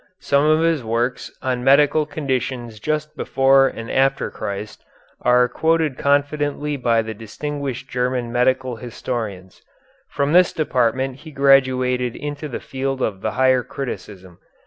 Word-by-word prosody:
Some 140 +1 +2
of 155 +1 +4
his 165 -5 +1
works 115 +3 -1
on 125 -1 -1
medical 145 +3 +4
conditions 130 -6 -3
just 155 +4 -2
before 135 0 +4
and 115 -2 -6
after 135 +1 +1
Christ 100 +1 -6 0.4
are 125 0 +4
quoted 160 +2 +1
confidently 145 +1 0
by 115 -4 +1
the 110 0 -5
distinguished 135 +4 -5
German 125 -1 -2
medical 125 0 +1
historians. 110 -5 -6 0.5
From 140 +1 -1
this 180 0 +5
department 130 -3 0
he 155 - -12
graduated 130 -3 +2
into 145 +1 -5
the 130 - -5
field 135 0 -3
of 95 -3 -2
the 110 - -2
higher 130 0 +3
criticism. 95 -9 -7
130 Hz, 135 wpm, -21 LUFS, 120-145 Hz, 0.5 s, this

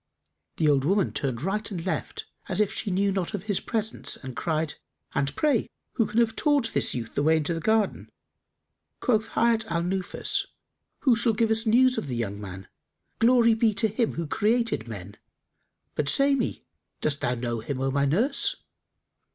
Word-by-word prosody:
The 155 - +2
old 140 -2 +3
woman 195 +6 +1
turned 130 -3 -3
right 210 +4 -1
and 180 -5 -5
left, 190 - -3 0.2
as - - 0
if 210 -2 +2
she 210 - -3
knew 195 +2 +1
not 190 +1 -2
of 195 - -5
his 205 -3 0
presence, 220 -2 -2
and 130 -2 -8
cried, 160 -2 -1 0.4
"And 140 0 -1
pray, 290 -7 +1 0.2
who 225 -4 +1
can 215 +3 0
have 225 -1 +2
taught 285 -6 +1
this - - +1
youth 115 -2 -5
the - - 0
way 160 +2 +4
into 155 +2 -1
this 165 - -4
garden?" 220 +2 +1 0.9
Quoth 220 -2 +1
Hayat 230 -1 +3
al 170 0 0
Nufus, 185 +1 -1 0.5
"Who 255 -4 +4
shall 230 0 +2
give 225 +1 +1
us 225 +1 0
news 255 +3 +4
of - - -6
the 125 - -3
young 105 -3 -3
man? 95 -1 -8 0.5
Glory 235 0 +5
be 220 -1 +2
to 220 - +2
Him 220 +2 -1
who 170 - -2
created 215 - 0
men! 100 -3 -8 0.8
But 145 -1 -1
say 275 - +5
me, 265 -3 -2 0.3
dost 145 -2 0
thou 125 - 0
know 120 -1 -3
him, 130 +4 -4
O 135 0 0
my 140 +1 +2
nurse?" 225 - +1
195 Hz, 185 wpm, -26 LUFS, 140-225 Hz, 0.9 s, Glory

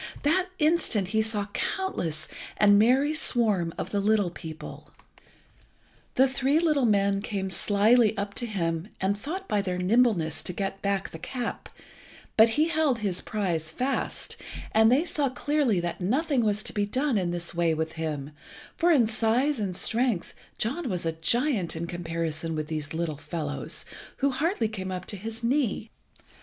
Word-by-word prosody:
that 355 +6 +2
instant 300 - +2
he 220 +1 +2
saw 220 -1 0
the 200 - -11 0.3
countless 165 - -3 0.3
and 205 -1 +6
merry 265 +7 +4
swarm 215 - +2
of - - -4
the 205 - +1
little 205 -3 +2
people. 160 -1 -9 1.3
The 265 +1 +5
three 270 +2 +1
little 305 -7 +2
men 200 -1 +2
came 195 -2 -3
slily 215 +4 +3
up 200 0 -3
to 240 - -2
him, 165 -4 -2
and 195 +2 +1
thought 355 - -5
by 205 - +1
their 185 -2 -2
nimbleness 185 -4 +2
to 180 - -2
get 195 +1 -3
back 200 -1 -1
the 160 - -8
cap, 245 +7 -5 0.7
but 225 +1 +7
he 315 +2 +3
held 310 -6 +2
his 200 -5 -2
prize 175 -7 -2
fast, 255 +11 -2 0.3
and 220 +1 +5
they 285 +7 +3
saw 290 -5 0
clearly 270 -5 +1
that 175 +2 -4
nothing 265 - +1
was 210 0 +1
to - - -4
be 205 -1 0
done 260 +4 0
in 185 -4 +1
this 175 0 -3
way 170 -1 +1
with 160 0 -2
him, 155 -3 -4 0.4
for 345 +1 +3
in 270 -8 +5
size 230 +5 +1
and 195 -4 -2
strength 230 -3 0 0.2
John 270 +6 -2
was 180 -4 -2
a 165 - +1
giant 190 - 0
in 165 +1 -3
comparison 165 -2 -3
with 155 0 -3
these 155 -1 -4
little 165 -3 -2
fellows, 145 0 -4 0.3
who 280 0 +2
hardly 295 - 0
came 190 -3 -5
up 185 0 -4
to - - -5
his 225 +4 -7
knee. 235 -4 0
210 Hz, 170 wpm, -27 LUFS, 175-255 Hz, 1.3 s, but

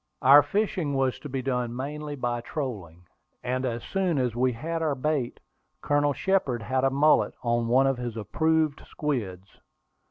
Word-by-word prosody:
Our 140 +3 +9
fishing 175 -2 -1
was 135 -1 0
to 145 - -8
be 130 -1 -3
done 125 -2 -2
mainly 145 +3 -5
by 120 -3 -2
trolling, 100 - -6 0.4
and 130 +1 -1
as 120 -1 -4
soon 185 -5 -1
as 125 -4 0
we 125 +1 +2
had 165 +7 -4
our 155 -3 0
bait, 140 -2 -2 0.4
Colonel 145 0 +2
Shepard 140 - 0
had 130 +4 0
a 135 - +4
mullet 145 +3 +3
on 120 -1 0
one 130 +3 +4
of 135 -1 +1
his 120 -2 -5
approved 155 +7 0
squids. 100 -11 -4
135 Hz, 165 wpm, -26 LUFS, 120-150 Hz, 0.4 s, Our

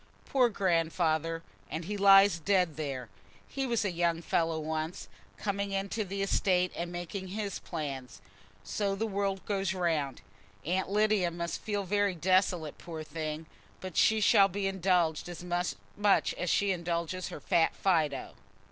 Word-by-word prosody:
"Poor 255 -3 +3
Grandfather! 165 -4 0 0.3
And 160 +1 -4
he 205 +4 -3
lies 195 -2 +6
dead 180 -2 +2
there. 140 -5 -4 0.4
He 270 -1 -3
was 235 -3 0
a 195 - 0
young 170 -1 0
fellow 165 -1 +1
once, 160 +3 -3 0.3
coming 200 -1 -2
into 195 +3 -1
the 195 0 -3
estate 180 -2 +2
and 175 0 -4
making 175 +2 -5
his 200 +1 -4
plans. 140 -6 -6 0.4
So 200 -2 -1
the 220 +3 -1
world 195 -2 -2
goes 195 -2 -1
round! 160 -7 -1 0.4
Aunt 185 +4 0
Lydia 210 -3 +2
must 170 0 -4
feel 205 -2 -2
very 200 0 +1
desolate, 180 -2 +1
poor 160 -2 -7
thing; 155 0 -5 0.3
but 185 -2 -7
she 220 0 +4
shall 195 -1 +6
be 200 +1 -3
indulged 180 -4 +1
as 175 0 -7
much 180 +3 0
as 180 - -3
she 200 +3 +2
indulges 170 0 -2
her - - -7
fat 160 +3 +2
Fido." 160 -7 0
180 Hz, 150 wpm, -30 LUFS, 165-200 Hz, 0.4 s, lies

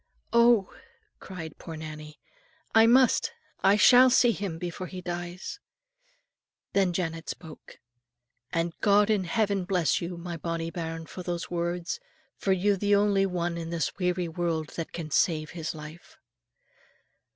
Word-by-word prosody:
"Oh," 235 -4 +4 0.5
cried 165 -5 -8
poor 165 -2 -8
Nannie, 155 -1 -9 0.5
"I 225 0 +7
must, 260 - +4 0.3
I 195 +1 +6
shall 250 +4 +7
see 245 -1 +5
him 195 -6 -4
before 180 +2 -5
he 185 - -7
dies." 175 +1 -6 1.1
Then 195 -2 +3
Janet 165 -2 -3
spoke. 160 -3 -9 0.7
"And 165 -1 -1
God 205 0 +4
in 200 -3 +1
heaven 200 0 0
bless 180 -5 +1
you, 175 0 -5
my 170 0 -6
bonnie 165 0 -3
bairn, 165 -1 -5
for 185 - -8
those 175 -1 -4
words; 175 - -2 0.4
for 195 - -1
you're 195 +2 +2
the 205 +1 +3
only 200 -1 +3
one 175 -2 -2
in 165 -1 -5
this 170 -1 -2
weary 180 -1 0
world 165 -2 -2
that 165 - -6
can 160 -3 -6
save 155 -2 +1
his 165 -2 -5
life." 155 +2 -11
175 Hz, 145 wpm, -27 LUFS, 165-195 Hz, 1.1 s, I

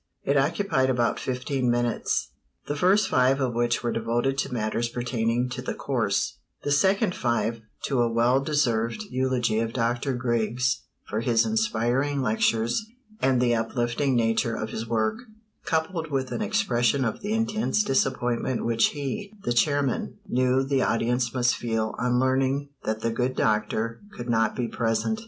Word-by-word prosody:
It 140 - +1
occupied 140 -1 +2
about 120 -2 +1
fifteen 130 0 -1
minutes, 120 -1 0 0.4
the 145 - -2
first 190 +6 +3
five 130 +1 +3
of 130 -3 0
which 120 +1 0
were 120 - 0
devoted 120 +4 0
to 140 - -1
matters 115 0 -1
pertaining 120 0 -1
to 125 0 -5
the 130 - -4
course; 115 -8 -1 0.2
the 145 - -1
second 190 +5 +3
five 115 -3 -1 0.2
to 135 -4 +1
a 120 -1 +1
well 120 +3 +3
deserved 135 - 0
eulogy 125 -4 +1
of 115 0 -2
Dr. 120 +2 0
Griggs 120 +1 0 0.2
for 110 - -2
his 115 -1 +2
inspiring 120 +6 0
lectures 115 - +1 0.4
and 130 -2 +3
the 120 -1 +3
uplifting 120 +3 0
nature 115 0 +1
of 110 0 -4
his 115 +1 -4
work, 110 - 0 0.5
coupled 160 0 -1
with 135 -2 -2
an - - -2
expression 140 - +1
of 110 - -3
the 205 +2 -2
intense 220 -1 +1
disappointment 130 - 0
which 115 -1 +3
he, 200 +9 -4
the 120 - 0
chairman, 140 +2 +1
knew 130 +1 +2
the 135 0 +1
audience 120 +1 +1
must 120 -1 +2
feel 115 -2 -2
on 125 0 +1
learning 135 +2 +1 0.2
that 110 0 -2
the 115 - 0
good 125 +3 -1
doctor 110 +1 0 0.2
could 120 0 -3
not 110 -1 +2
be 120 -2 -1
present. 115 - -1
120 Hz, 160 wpm, -26 LUFS, 115-135 Hz, 0.5 s, first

